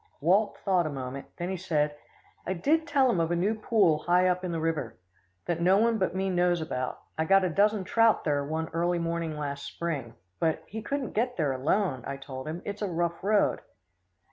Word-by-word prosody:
Walt 190 +8 +2
thought 180 -4 +3
a - - -2
moment; 135 -1 -6
then 175 +1 -3
he 190 - -2
said, 150 -4 0 0.5
"I 190 - 0
did 310 - +1
tell 280 -3 +3
him 235 -8 +2
of 165 -1 +1
a 175 - +1
new 190 +6 +1
pool 210 -8 +2
high 180 +3 +3
up 180 0 0
in 180 - -2
the 165 - -2
river, 155 -8 -2 0.5
that 170 -1 -1
no 185 +3 +5
one 225 +1 +2
but 185 - 0
me 190 +1 0
knows 175 -1 +2
about. 130 -5 -3 0.2
I 160 - +2
got 195 +3 +5
a 185 - +1
dozen 205 +3 +2
trout 225 +3 +3
there 145 -2 +1
one 160 +3 -2
early 175 +2 0
morning 165 -2 -2
last 140 -1 -4
spring; 140 -9 -4 0.2
but 160 -2 0
he 220 +2 -6
couldn't 275 +2 -3
get 245 +3 0
there 150 -5 +1
alone, 135 - 0
I 140 - -4
told 135 0 -8
him. 165 +3 -5
It's 205 +1 -5
a 205 - 0
rough 170 -1 -2
road." 210 +1 +2
175 Hz, 215 wpm, -28 LUFS, 155-195 Hz, 0.5 s, no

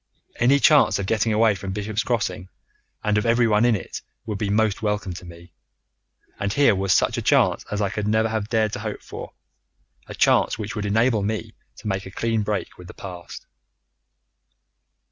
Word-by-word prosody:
Any 130 +4 +4
chance 150 +1 +5
of 100 - -3
getting 110 +2 +1
away 110 0 +4
from 95 -1 -5
Bishop's 105 +2 -2
Crossing 95 -7 -2 0.5
and 105 0 +2
of 105 - -3
everyone 115 -1 +3
in 120 -2 +4
it 95 - -6 0.2
would 105 -4 -4
be 105 - -1
most 105 0 +1
welcome 105 -3 -1
to 90 - -10
me. 85 0 -13 0.9
And 100 0 -1
here 140 +1 +4
was 95 -1 -1
such - - +2
a - - -3
chance - - +3
as 105 0 -2
I 100 -2 0
could 105 0 -3
never 110 +1 +2
have 110 -1 -3
dared 110 -2 +1
to - - -3
hope - - -5
for, - - -9 0.7
a - - -8
chance - - +3
which 105 0 -5
would 105 -1 -2
enable 110 +1 +2
me 105 +2 -3 0.2
to - - -9
make 95 -1 -2
a - - -7
clean 115 +3 -1
break 105 -2 -3
with 90 - -11
the - - -11
past. 90 -3 -9
105 Hz, 190 wpm, -23 LUFS, 100-110 Hz, 0.9 s, chance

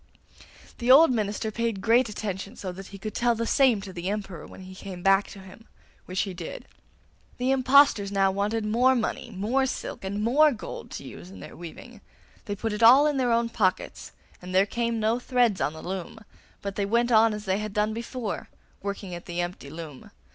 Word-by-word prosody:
The 240 0 -2
old 285 +3 +8
minister 215 -1 -1
paid 230 -2 -2
great 230 +4 +3
attention, 205 0 -5
so 190 -5 -5
that 190 +1 -9
he 200 - -10
could 215 +2 -6
tell 240 -1 +2
the 230 +1 -2
same 250 -5 +3
to 190 -1 -9
the 180 +1 -4
Emperor 195 -5 -5
when - - -12
he 185 0 -10
came 185 -1 -9
back 195 +1 +4
to - - -11
him, 190 +4 -14 0.4
which 185 +1 -1
he 195 - -3
did. 170 -2 -8 0.7
The 255 +2 0
impostors 260 -6 +4
now 195 -1 +3
wanted 210 +3 -1
more 245 +5 +3
money, 235 +1 -2
more 235 +7 0
silk, - - -5
and 200 +2 -3
more 295 +7 +5
gold 215 - -8
to - - -6
use 85 +2 -10
in 95 0 -12
their - - -10
weaving. 205 +7 -11 0.4
They 205 - -3
put 220 +2 -3
it 210 - -4
all 255 +6 +8
in 295 -2 +1
their 250 -2 +1
own 230 0 +2
pockets, 190 -5 -1 0.3
and 180 +1 -6
there 190 +1 +5
came 235 +1 -2
no 220 +2 +1
threads 245 -5 +1
on 140 +3 0
the 160 - -10
loom, 185 +2 -5 0.5
but 200 -1 -5
they 200 - +1
went 235 +3 +2
on 225 0 +6
as 210 0 -6
they 190 +1 0
had 215 0 -4
done 210 +1 0
before, 230 -1 -5 0.3
working 200 -2 -5
at 175 0 -8
the 175 -1 -4
empty 175 -5 -4
loom. 155 -3 -9
210 Hz, 210 wpm, -26 LUFS, 190-235 Hz, 0.7 s, old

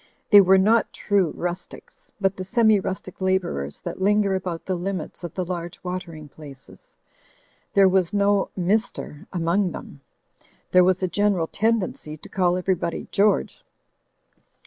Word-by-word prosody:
They 205 -1 +10
were 190 0 +5
not 220 +4 +3
true 200 -5 +1
rustics, 180 - -7
but 195 -1 +1
the 185 - -5
semi 220 +1 +3
rustic 190 0 -6
labourers 180 - -1
that - - -6
linger 205 0 +2
about 180 -3 -4
the 190 - -1
limits 180 -1 -4
of 170 - -7
the 185 - -2
large 175 0 -5
watering 180 -4 -6
places. 140 -2 -14 0.8
There 195 -1 +6
was 185 -2 +2
no 200 -1 +2
"Mr. 185 -5 -2
among 175 +1 0
them. 140 - -10 0.7
There 180 0 +6
was 185 +1 +2
a - - +2
gen 205 +3 +1
eral 165 -2 -2
tendency 205 -8 -1
to - - -14
call 180 -1 +1
everybody 180 -2 -2
George. 205 +1 +1
185 Hz, 145 wpm, -23 LUFS, 175-200 Hz, 0.8 s, They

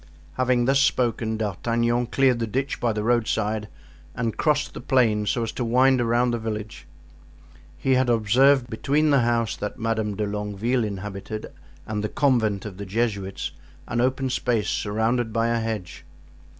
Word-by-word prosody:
Having 125 -1 +1
thus 135 +2 +3
spoken, 115 -5 +1
D'Artagnan 115 +3 0
cleared 130 -1 +2
the 115 - -1
ditch 135 +5 -2
by 120 - +1
the 105 -1 -2
roadside 110 -2 0 0.5
and 115 -2 -2
crossed 150 -2 +1
the - - -7
plain 110 -6 +2
so 120 - 0
as 115 - -3
to 125 - -3
wind 130 +2 +4
around 120 +1 +2
the 120 - -1
village. 110 -4 -6 0.9
He 130 +10 +1
had 130 -1 +2
observed 120 +4 +4
between 145 +7 +1
the 140 - +5
house 115 -1 +1
that 105 - -5
Madame 110 -3 -1
de 105 +1 -1
Longueville 105 +4 -1
inhabited 105 +1 -6 0.3
and 105 -1 -3
the 105 - -1
convent 110 -9 +1
of 100 -3 -7
the 100 - -6
Jesuits, 100 -2 -2 0.4
an 120 - 0
open 130 +1 0
space 120 -5 0
surrounded 110 +3 0
by 115 +1 +1
a 115 0 +1
hedge. 110 -6 -4
115 Hz, 165 wpm, -24 LUFS, 105-125 Hz, 0.9 s, the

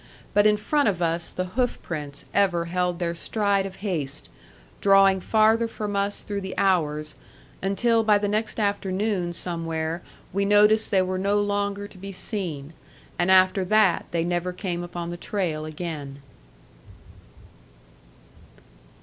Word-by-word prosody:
But 205 +1 +5
in 210 0 +4
front 285 +4 +1
of 185 -4 -2
us 170 0 -1
the 185 0 -4
hoofprints 155 - -3
ever 185 -4 +2
held 180 0 -1
their 170 -1 -1
stride 200 +2 0
of 190 - -10
haste, 150 -8 -2 0.5
drawing 195 -1 +5
farther 220 +3 +3
from 210 -2 -4
us 200 +1 -1
through 205 -1 -4
the 190 -1 -6
hours, 155 -6 +1 0.5
until 225 +4 +2
by 210 -1 +5
the 205 0 -1
next 215 +2 -1
afternoon 200 -2 0
somewhere 165 -1 -3 0.3
we 200 +1 +1
noticed 210 +2 +4
they 190 -3 +3
were 185 0 -2
no 200 +2 +2
longer 205 0 -1
to 190 - -16
be 195 +1 -7
seen; 175 -7 -4 0.5
and 175 +1 +2
after 185 +1 +5
that 195 -2 +3
they 170 -1 0
never 175 +1 -1
came 180 -1 -4
upon 175 -1 -5
the 175 - -5
trail 170 -5 -2
again. 150 -4 -6
190 Hz, 140 wpm, -25 LUFS, 170-205 Hz, 0.5 s, But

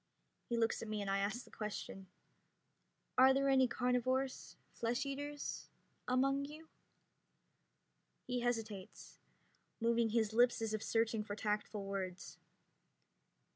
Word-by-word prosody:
He 235 - 0
looks 225 -1 +1
at 225 - -5
me 215 0 -2
and 195 -1 -1
I 195 - +2
ask 215 +5 -1
the - - -18
question: 205 -2 -5 1.1
"Are 265 +1 +8
there 275 0 +2
any 265 -1 +5
carnivores 255 +2 0 0.2
flesh 235 +3 -1
eaters 285 +1 -4 0.4
among 275 +2 +2
you?" 310 +3 -10 1.6
He 250 0 -1
hesitates, 225 -5 -3 0.6
moving 230 0 +3
his 220 -1 +1
lips 240 +1 +5
as 225 -1 -1
if 215 - -1
searching 225 -1 +1
for 205 -1 -5
tactful 210 -1 -2
words. 190 -2 -4
230 Hz, 125 wpm, -37 LUFS, 210-260 Hz, 1.6 s, Are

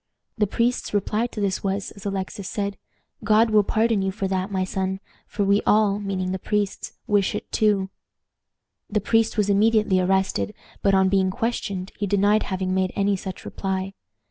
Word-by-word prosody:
The 210 -3 +1
priest's 235 +1 0
reply 210 +3 0
to 235 - -8
this 195 -2 -1
was, 195 0 -2
as 200 0 -8
Alexis 195 0 -4
said, 200 -1 -2 0.5
"God 220 +1 +4
will 215 -1 +6
pardon 220 0 +1
you 190 - 0
for 195 0 -3
that, 190 +1 -1
my 190 -1 0
son, 190 0 -2 0.3
for 205 - -2
we 200 +1 +3
all," 210 -1 +3
meaning 190 -2 -2
the 190 - -2
priests, 205 0 -2
"wish 205 -2 +1
it - - -6
too." 200 -3 +2 1.0
The 210 - +1
priest 225 +2 +1
was 210 -2 +2
immediately 210 -1 +3
arrested, 190 +2 0 0.3
but, 195 -1 +3
on 190 0 +4
being 190 -1 +2
questioned, 200 -4 -3
he 205 - -1
denied 205 +2 +3
having 185 -1 -1
made 185 -1 +1
any 200 0 +2
such 190 0 -7
reply. 190 0 -3
200 Hz, 175 wpm, -24 LUFS, 190-210 Hz, 1.0 s, will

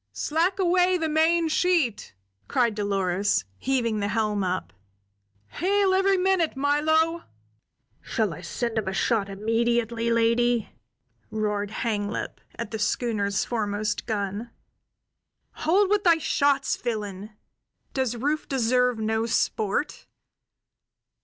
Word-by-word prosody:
"Slack 335 +5 0
away 365 0 +3
the 325 -2 -1
main 320 +2 +3
sheet!" 310 - 0 0.3
cried 235 -3 +2
Dolores, 195 - 0
heaving 240 -5 0
the 200 - -1
helm 210 -2 0
up. 185 - -3 0.8
"Hail 390 +1 +1
every 385 +1 +3
minute, 365 -5 +1
Milo!" 315 +4 +2 0.8
"Shall 215 -6 -1
I 180 - -9
send 235 +5 -2
him 215 - -5
a 190 - -1
shot 200 0 +1
immediately, 230 +3 0
lady?" 230 0 +2 0.6
roared 210 -1 -2
Hanglip, 215 -2 -3
at 235 -3 -6
the 220 - -4
schooner's 210 -2 0
foremost 210 -2 -2
gun. 205 +1 -3 1.0
"Hold 380 +6 +2
with 415 -1 +2
thy 340 -3 +5
shots, 285 -2 +1
villain! 210 -3 -5 0.6
Does 260 -3 -1
Rufe 290 +6 -2
deserve 250 -1 +2
no 220 +1 -1
sport? 220 +3 -1
235 Hz, 115 wpm, -25 LUFS, 210-315 Hz, 1.0 s, thy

